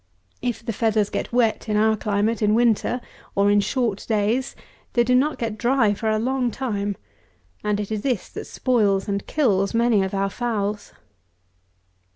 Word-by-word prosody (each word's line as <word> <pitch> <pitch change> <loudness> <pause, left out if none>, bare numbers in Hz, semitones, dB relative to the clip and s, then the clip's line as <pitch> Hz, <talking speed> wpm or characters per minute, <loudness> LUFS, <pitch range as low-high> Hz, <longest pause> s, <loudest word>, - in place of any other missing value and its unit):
If 240 -2 -3
the 230 - -2
feathers 215 -1 +1
get - - -3
wet, 235 -2 +1
in 210 - +1
our 220 +1 +3
climate, 210 +2 0
in 210 0 +3
winter, 240 +1 +2 0.3
or 200 +1 +3
in 205 - +4
short 225 -2 -1
days, 220 +5 0 0.4
they 240 - +4
do 250 +1 +1
not 280 +5 +2
get 225 -2 -4
dry 240 -4 +3
for 220 +2 -2
a 215 - +2
long 250 +2 0
time; 205 -5 -3 0.7
and 210 -1 0
this 205 0 -4
it 215 -2 -2
is 250 -8 -1
that - - -7
spoils 205 -7 +1
and 200 -1 -2
kills 205 -8 +1
many 230 -3 +3
of 190 +1 -2
our 195 0 0
fowls. 210 -3 -3
220 Hz, 175 wpm, -23 LUFS, 205-240 Hz, 0.7 s, in